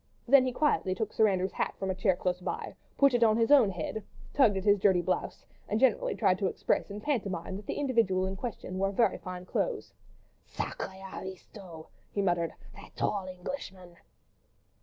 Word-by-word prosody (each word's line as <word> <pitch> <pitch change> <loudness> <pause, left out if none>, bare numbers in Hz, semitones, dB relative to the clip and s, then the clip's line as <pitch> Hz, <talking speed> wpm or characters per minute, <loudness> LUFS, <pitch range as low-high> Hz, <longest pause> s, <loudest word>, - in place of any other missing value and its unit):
Then 260 0 +6
he - - 0
quietly 250 -9 +1
took 215 +2 -3
Sir 220 - +4
Andrew's 190 -1 0
hat - - -2
from 190 -1 -2
a - - 0
chair 185 0 +2
close 180 0 -2
by, - - -4 0.2
put 275 -2 +5
it 240 -1 +3
on 220 -1 +4
his 230 +3 +2
own 265 -8 +7
head, 190 +4 -4 0.3
tugged 235 -8 +4
at 190 - -3
his 205 -1 +4
dirty 185 -3 +3
blouse, 185 - -2 0.2
and 215 - +1
generally - - +2
tried - - +2
to - - +1
express - - -1
in 200 +1 -6
pantomime 200 - -2
that 205 - -11
the - - -2
individual 230 -9 +2
in 190 +1 -3
question 190 -4 -5
wore 195 0 +1
very 210 0 +2
fine 180 0 -7
clothes. 455 - -2 0.6
"Sacrré 190 0 -5
aristo!" 185 -3 -9 0.2
he 200 - -1
muttered, 175 -3 +1 0.2
"that - - -14
tall 195 -2 -1
Englishman!" 185 -2 -7
195 Hz, 185 wpm, -30 LUFS, 185-230 Hz, 0.6 s, own